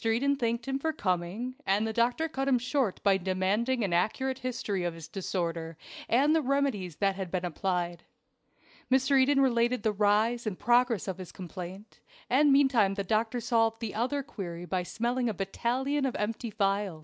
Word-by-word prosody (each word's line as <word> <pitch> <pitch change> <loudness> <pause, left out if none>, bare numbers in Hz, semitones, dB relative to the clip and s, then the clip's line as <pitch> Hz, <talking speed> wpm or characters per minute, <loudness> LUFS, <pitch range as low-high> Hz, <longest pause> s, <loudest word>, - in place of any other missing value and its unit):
Eden 240 +5 +2
thanked 235 -2 -2
him 270 0 -1
for 320 +3 0
coming, 190 - -2
and 200 +3 +1
the 220 - -2
doctor 240 +7 +1
cut 270 -3 -3
him 265 -2 +4
short 250 -3 -1
by 195 -2 +4
demanding 195 +7 0
an 190 -4 -1
accurate 260 +9 0
history 225 -7 -2
of 175 -1 -2
his 165 -1 -9
disorder, 165 -3 -3 0.3
and 280 +6 +4
the 320 - +3
remedies 265 - 0
that 195 +1 +1
had 190 -2 -4
been 180 0 -2
applied. 175 -1 -2 0.9
Mr. 265 +1 +4
Eden 275 +1 +3
related 240 -2 +2
the 220 - +2
rise 215 +3 +2
and 195 -4 -3
progress 240 -1 +2
of 190 -1 -4
his 185 - -8
complaint, 185 +3 -9 0.3
and 285 +3 +5
meantime 260 -8 +4
the 200 - -2
doctor 220 +4 0
solved 225 -1 +1
the 225 -3 -4
other 260 +6 -1
query 175 -9 -7
by 185 0 -1
smelling 240 +6 -1
a 215 - -3
battalion 250 +9 -1
of 255 - -4
empty 225 +3 -2
phials. 195 -4 -1
225 Hz, 180 wpm, -29 LUFS, 190-255 Hz, 0.9 s, and